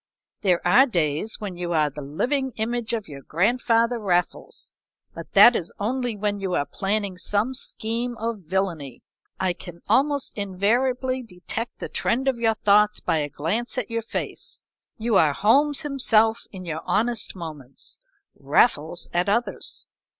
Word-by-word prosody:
"There 180 -3 +2
are 250 +10 +6
days 170 - 0
when 200 -4 -5
you 175 -1 -3
are 150 -2 +2
the 150 - -8
living 255 - -1
image 230 +1 -2
of 225 -3 -2
your 140 -2 -9
grandfather 230 - +1
Raffles, 180 -4 -1 0.4
but - - -10
that 240 - +9
is 170 - -2
only 245 +2 -1
when 205 0 -1
you 190 -2 -1
are 145 - +1
planning 200 0 -2
some 210 +7 +1
scheme 235 -1 -3
of 225 -1 -3
villany. 170 -8 -2 0.4
I 185 -1 +1
can 175 -1 -11
almost 280 +5 +2
invariably 245 +7 0
detect 225 +2 -6
the - - -5
trend 265 +3 0
of 260 -3 +1
your 225 -1 +2
thoughts 210 0 +4
by 165 -2 0
a 145 -1 -1
glance 210 - -2
at 240 -3 -3
your 230 0 -1
face 225 - -5 0.3
you 225 -2 +2
are 150 -4 +4
Holmes 275 - +3
himself 225 -6 +3
in 185 -2 -8
your 160 -2 -4
honest 225 0 0
moments, 155 -7 -8 0.3
Raffles 170 -6 +2
at 175 +3 +1
others. 235 +4 -1
210 Hz, 155 wpm, -24 LUFS, 175-240 Hz, 0.4 s, that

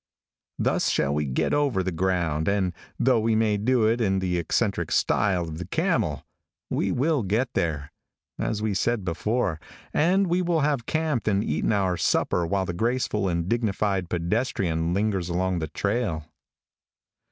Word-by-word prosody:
Thus - - +1
shall 70 - +1
we 75 0 0
get 65 -2 0
over 140 -10 +1
the 95 - -2
ground, 85 -3 0
and 95 -3 +1 0.2
though 125 -2 +3
we 110 0 +1
may 110 -1 +2
do 115 +2 +2
it 115 +2 +2
in 95 -3 +2
the 90 -2 0
eccentric 85 0 0
style 95 -4 +2
of 80 -1 -6
the 90 - -6
camel, - - 0 0.5
we - - 0
will 145 +2 +1
get 110 +6 0
there, 75 -4 -1 0.5
as 105 -1 -2
we 110 -2 0
said 110 0 0
before, 95 0 -1 0.3
and 185 +6 +3
we 180 0 +1
will 170 -3 +1
have 140 -5 0
camped 155 -8 -1
and 100 -1 +2
eaten - - 0
our 95 -4 +1
supper 85 0 +1
while 95 +2 0
the 85 - -3
graceful 110 -1 0
and 85 -1 -1
dignified 100 -5 0
pedestrian 85 -3 -1
lingers 95 -2 0
along 90 +1 0
the 80 - -3
trail. 100 -4 -2
100 Hz, 165 wpm, -25 LUFS, 85-115 Hz, 0.5 s, though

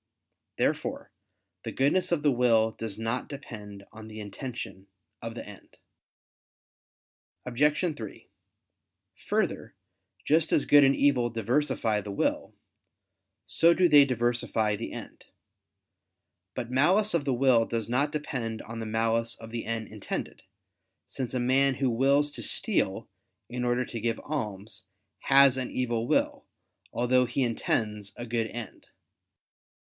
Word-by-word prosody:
Therefore - - -1 0.5
the - - -4
goodness 145 +8 +1
of 160 -4 +1
the 145 - +4
will 115 -3 +3
does 110 -2 -6
not 115 +3 -2
depend 105 -8 -9
on 110 0 -10
the 110 0 -9
intention 105 -2 -7 0.3
of - - -6
the - - -7
end. - - -13 1.7
Obj. 145 +5 +2 0.2
3: 110 -6 -9 0.9
Further, - - -2 0.5
just 160 +2 +2
as - - +3
good 145 0 +7
and 135 0 +4
evil 130 -4 +3
diversify 115 -1 0
the 100 0 -7
will, 100 - -1 0.9
so 170 +1 +4
do 180 +2 +4
they 145 -3 +8
diversify 120 -4 0
the 115 - -6
end. - - -9 1.3
But 120 -2 -4
malice 185 +11 +3
of 170 -4 +1
the 140 -2 0
will 120 -2 +4
does 115 -2 -2
not 140 +5 +1
depend 125 -7 -4
on 115 0 -7
the 110 - -4
malice 115 +1 0
of 115 0 -11
the 115 -1 -4
end 110 -1 -3
intended; - - -6 0.7
since 130 -2 -5
a - - +1
man 135 +2 +3
who 135 0 0
wills 140 +5 +3
to - - -5
steal - - -1 0.4
in 125 +2 -4
order 125 +1 +1
to 115 -2 -6
give 115 0 -1
alms, 110 -8 -5 0.3
has 135 -1 +5
an 130 -1 -3
evil 120 -2 -1
will, - - 0 0.5
although 125 +1 +2
he 125 +3 -1
intends 105 -3 -1
a 120 - -5
good 115 -1 -1
end. 115 -3 -8
120 Hz, 140 wpm, -28 LUFS, 115-140 Hz, 1.7 s, they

